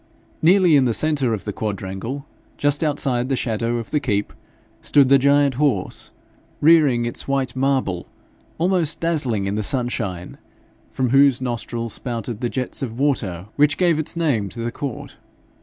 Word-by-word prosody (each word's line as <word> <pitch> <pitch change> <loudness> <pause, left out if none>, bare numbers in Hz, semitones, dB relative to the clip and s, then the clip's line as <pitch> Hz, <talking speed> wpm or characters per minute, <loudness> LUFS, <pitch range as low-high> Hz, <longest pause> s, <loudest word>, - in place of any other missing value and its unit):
Nearly 180 -1 +5
in 135 -2 +4
the 115 -3 +1
centre 145 -6 +1
of 110 -3 -3
the 105 - -4
quadrangle, 105 +7 -5 0.3
just 145 +2 +1
outside 135 -4 -1
the 135 - +1
shadow 115 -1 -1
of 115 -2 -6
the 150 - +2
keep, 105 -7 -1 0.5
stood 140 -3 +4
the 140 0 +6
giant 140 0 +3
horse, 125 -11 -1 0.5
rearing 145 -7 +4
in 120 - -3
white 135 -2 -1
marble, 130 -9 0 0.5
almost 170 -2 0
dazzling 140 -12 0
in 100 - -2
the 105 - -1
sunshine, 110 - -2 0.5
from 130 -2 -1
whose 135 -1 +5
nostrils 120 -2 -4
spouted 120 -2 -5
the 120 - -1
jets 130 +2 -3
of 120 -4 -4
water 105 -10 -1
which 150 +1 +3
gave 170 -4 +2
its 155 - -2
name 135 -12 0
to 115 - -8
the 120 +1 -2
court. 135 0 -6
130 Hz, 160 wpm, -21 LUFS, 115-145 Hz, 0.5 s, the